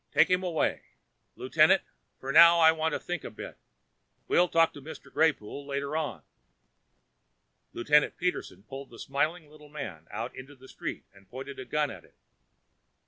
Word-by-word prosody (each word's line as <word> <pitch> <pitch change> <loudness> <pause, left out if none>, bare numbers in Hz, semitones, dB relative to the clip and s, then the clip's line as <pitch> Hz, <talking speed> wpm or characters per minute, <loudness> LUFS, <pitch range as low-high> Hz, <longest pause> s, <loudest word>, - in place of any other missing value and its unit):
Take - - +4
him 180 0 +3
away, 175 -4 -1 0.5
Lieutenant, - - +3 0.4
for 135 - -4
now. 170 +3 +8
I 160 -1 +7
want 160 -1 -1
to - - -1
think 175 -3 -5
a - - -6
bit. - - -10 0.7
We'll 180 - +4
talk 165 0 +3
to 145 - -11
Mr. 160 +4 -11
Greypoole 145 -4 0
later 140 +1 -3
on." 140 - -3 1.5
Lieutenant 150 +5 +2
Peterson 180 - -3
pulled 135 +4 -9
the 115 - -14
smiling 155 +5 -2
little 150 0 -16
man 105 - -8
out 115 +4 -5
into 135 +3 -11
the 130 0 -16
street - - -6
and 100 -1 -21
pointed 135 +2 -8
a 130 - -6
gun 150 -1 -1
at - - -11
him. - - -26
145 Hz, 165 wpm, -28 LUFS, 130-160 Hz, 1.5 s, now